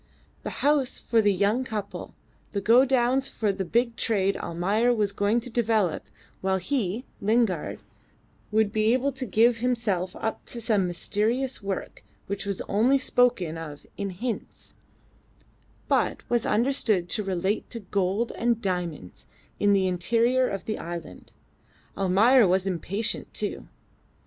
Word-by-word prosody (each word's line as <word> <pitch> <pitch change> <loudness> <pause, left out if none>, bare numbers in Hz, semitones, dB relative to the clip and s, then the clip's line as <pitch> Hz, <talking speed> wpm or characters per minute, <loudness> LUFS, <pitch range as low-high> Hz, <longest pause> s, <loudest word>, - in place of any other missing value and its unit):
The - - -5
house 285 -3 +2
for 230 -2 +2
the 205 -1 +3
young 205 +6 +1
couple; 215 -5 -6 0.4
the 200 - 0
godowns 255 +4 +3
for 215 -2 0
the 195 0 -3
big 235 +6 0
trade 200 -3 +1
Almayer 200 +8 0
was 210 -3 +1
going 205 +3 +1
to 245 - -7
develop 220 - 0 0.3
while 190 0 +1
he 220 +2 -2 0.2
(Lingard) 210 -5 +1 0.7
would 215 -1 +2
be 220 +1 +2
able 265 +2 +1
to 265 -1 -4
give 230 +2 +4
himself 225 -7 -1
up 220 - -3
to 240 - -5
some 210 -5 +1
mysterious 225 +9 -1
work 195 -1 -5 0.2
which 200 0 -4
was 200 -2 -2
only 235 +7 +3
spoken 240 -11 +1
of 150 -3 -9
in 200 -1 -3
hints, 220 +5 -6 1.1
but - - 0
was 240 -1 +1
understood 220 -6 +1
to 215 - 0
relate 190 +2 -1
to 230 - -6
gold 200 +3 -1
and 235 -1 +1
diamonds 175 - -4 0.3
in 205 - +3
the 195 -1 +3
interior 235 +8 +2
of 195 - -5
the 215 - -3
island. 170 - -8 0.6
Almayer 205 +5 +5
was 185 +1 +2
impatient 195 +4 -2
too. - - -2
210 Hz, 140 wpm, -26 LUFS, 190-240 Hz, 1.1 s, Almayer